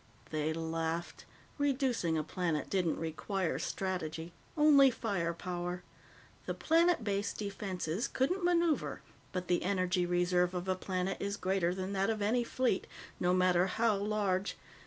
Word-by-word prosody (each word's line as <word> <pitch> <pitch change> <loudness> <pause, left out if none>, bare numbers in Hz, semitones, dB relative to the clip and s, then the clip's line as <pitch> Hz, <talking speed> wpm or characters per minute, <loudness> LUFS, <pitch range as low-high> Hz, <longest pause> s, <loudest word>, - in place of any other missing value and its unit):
They 155 0 0
laughed. 165 +1 -3 0.3
Reducing 260 - +1
a 155 - 0
planet 160 -2 -2
didn't 180 -5 +1
require 165 +3 -2
strategy 170 -3 -3 0.2
only 290 -3 +7
fire 200 -8 -1
power. 175 +1 -4 0.6
The - - -2
planet 335 -3 +3
based 200 -1 -1
defenses 195 - -3
couldn't 355 +9 0
maneuver, 340 -3 +1 0.3
but 180 -1 -3
the 175 - +2
energy 185 -1 +1
reserve 180 0 +2
of 180 +1 -3
a 190 - +3
planet 185 0 -2
is 200 0 -2
greater 185 -2 +1
than 190 +1 -3
that 195 +1 +1
of 220 -1 0
any 225 +4 +2
fleet, 240 -4 0 0.3
no 180 - +2
matter 185 0 +4
how 225 +2 +2
large. 200 -1 0
185 Hz, 140 wpm, -33 LUFS, 175-215 Hz, 0.6 s, only